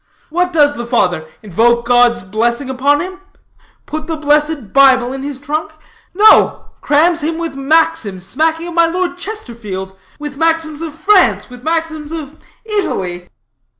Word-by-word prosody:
What 360 +2 0
does 295 -3 +3
the 240 -4 -6
father? 180 -9 0 0.2
Invoke 235 +4 +2
God's 245 -2 +3
blessing 235 +7 -1
upon 280 +3 +2
him? 375 +1 -7 0.6
Put 310 0 -6
the 325 - -2
blessed 300 -5 0
Bible 260 -2 +5
in 270 - -6
his 280 -1 -6
trunk? 305 +2 -4 0.4
No. 425 +3 +4
Crams 325 +3 +2
him 320 +2 -2
with 335 -2 -4
maxims 275 - +1
smacking 320 - -1
of 345 - -7
my 335 0 +4
Lord 355 +1 -2
Chesterfield, 235 - -6 0.2
with 295 -2 -7
maxims 325 -1 0
of 320 -2 -6
France, 380 -6 +2
with 250 -1 -11
maxims 320 -1 -2
of 310 -3 -6 0.3
Italy." 185 - -3
295 Hz, 150 wpm, -15 LUFS, 240-330 Hz, 0.6 s, Bible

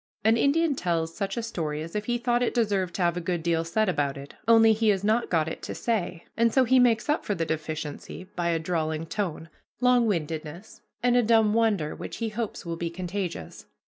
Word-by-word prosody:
An 220 +2 +5
Indian 295 +6 +2
tells 165 -7 -1
such 200 +3 -3
a 235 - -1
story 155 -9 -3
as 165 +4 -9
if 210 0 -2
he 240 +1 0
thought 240 0 +1
it 245 - 0
deserved 200 -6 0
to 185 - 0
have 170 0 +1
a - - -2
good 175 -1 -2
deal 165 -1 +1
said 215 +6 0
about 145 -6 0
it, 140 +1 -10
only 225 -1 +7
he 220 0 +2
has 195 -2 +2
not 220 +3 +1
got 160 -3 +1
it 160 - -5
to - - -6
say, 185 -7 -2
and 230 0 +3
so 260 +3 +4
he 255 +1 +4
makes 235 -2 +3
up 300 +1 +1
for 205 - -1
the 165 - -1
deficiency 155 +1 -5
by 175 -1 0
a 165 - +2
drawling 160 -1 -2
tone, 170 -3 -3 0.3
long 250 -1 +4
windedness, 165 0 -4 0.2
and 245 0 +3
a 245 - +5
dumb 225 -2 +4
wonder 210 -9 +1
which - - -7
he 230 -1 -2
hopes 215 -2 -4
will 165 -1 -4
be 170 0 -2
contagious. 180 - -5
195 Hz, 225 wpm, -26 LUFS, 165-230 Hz, 0.3 s, only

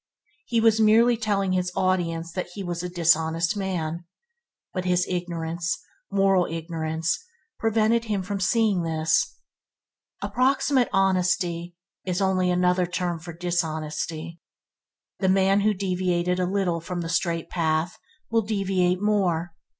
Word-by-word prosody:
He 235 -2 +1
was 225 -1 +4
merely 230 +3 +5
telling 205 -4 0
his 180 -1 0
audience 170 -3 0
that 180 +1 -3
he 200 - -5
was 175 -2 -3
a 180 - -4
dishonest 165 +1 +2
man, 175 -4 -3 0.7
but 185 - -2
his 180 0 +2
ignorance, 170 -1 -2 0.3
moral 195 -2 +3
ignorance, 160 - -2 0.4
prevented 225 +1 +2
him 205 -4 -1
from 200 +1 -3
seeing 205 -1 +2
this. 160 -1 +1 0.9
Approximate 260 0 +2
honesty 180 -2 +1 0.3
is 180 0 -2
only 190 -2 +2
another 180 0 +2
term 175 -1 -2
for 170 +2 -8
dishonesty. 165 -1 -3 0.8
The 190 - +2
man 195 +1 +4
who 215 +1 +3
deviated 180 -2 0
a 180 - +1
little 185 -4 0
from 175 +1 -4
the 165 - -4
straight 170 -1 0
path, 160 0 0 0.3
will 230 0 +3
deviate 195 -3 0
more. 175 -5 +1
180 Hz, 130 wpm, -25 LUFS, 170-195 Hz, 0.9 s, merely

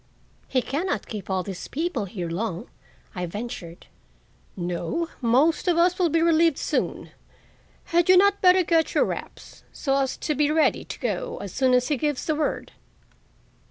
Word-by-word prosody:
"He 255 -2 0
can 310 +8 -2
not 215 - -2
keep 210 -3 -7
all 190 -1 0
these 190 -2 -7
people 325 - -2
here 185 -3 -5
long," 180 +1 -4 0.4
I 180 -1 -3
ventured. 175 -4 -7 0.7
"No; 175 - -2
most 265 +10 +2
of 345 -2 +3
us 355 +2 +3
will 350 -2 +3
be 330 +2 +2
relieved 330 -2 +3
soon. - - -2 0.8
Had 345 +1 +3
you 370 - +8
not 400 +1 +4
better 365 0 +6
get 330 -1 +1
your - - +4
wraps - - -8
so 270 -1 -1
as 270 -1 -1
to 305 - -2
be 295 +1 +1
ready 310 +1 +2
to - - -8
go - - -3
as - - -7
soon 260 -2 +3
as 250 +2 +1
he 295 - +1
gives 295 -1 -2
the 310 - +1
word?" 305 0 -2
295 Hz, 175 wpm, -24 LUFS, 210-335 Hz, 0.8 s, you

